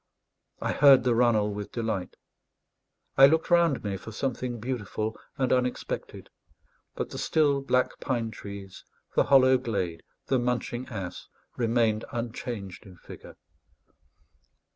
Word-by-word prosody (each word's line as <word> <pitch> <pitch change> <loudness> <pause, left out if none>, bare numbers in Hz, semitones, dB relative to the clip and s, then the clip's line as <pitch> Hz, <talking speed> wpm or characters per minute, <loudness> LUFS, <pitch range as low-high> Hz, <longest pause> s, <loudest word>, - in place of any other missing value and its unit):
I - - 0
heard 140 -2 +7
the 125 - +2
runnel 115 -3 +2
with 105 0 -6
delight; 110 -6 -3 1.0
I 135 - +11
looked 160 +4 +1
round 170 -5 +3
me 100 -2 -2
for 110 - -10
something 125 0 -3
beautiful 110 -2 -3 0.2
and 130 -3 +1
unexpected; 125 -1 -3 0.6
but - - -4
the - - -6
still 145 -3 +2
black 130 -2 0
pine 115 -4 -2
trees, 100 -2 -9 0.3
the - - +3
hollow 130 -2 +5
glade, 95 -9 -3 0.2
the 130 - +1
munching 125 0 -2
ass, 95 -6 -6 0.3
remained 115 -2 +1
unchanged 115 -5 -5
in 90 -2 -14
figure. - - -12
120 Hz, 125 wpm, -27 LUFS, 105-130 Hz, 1.0 s, I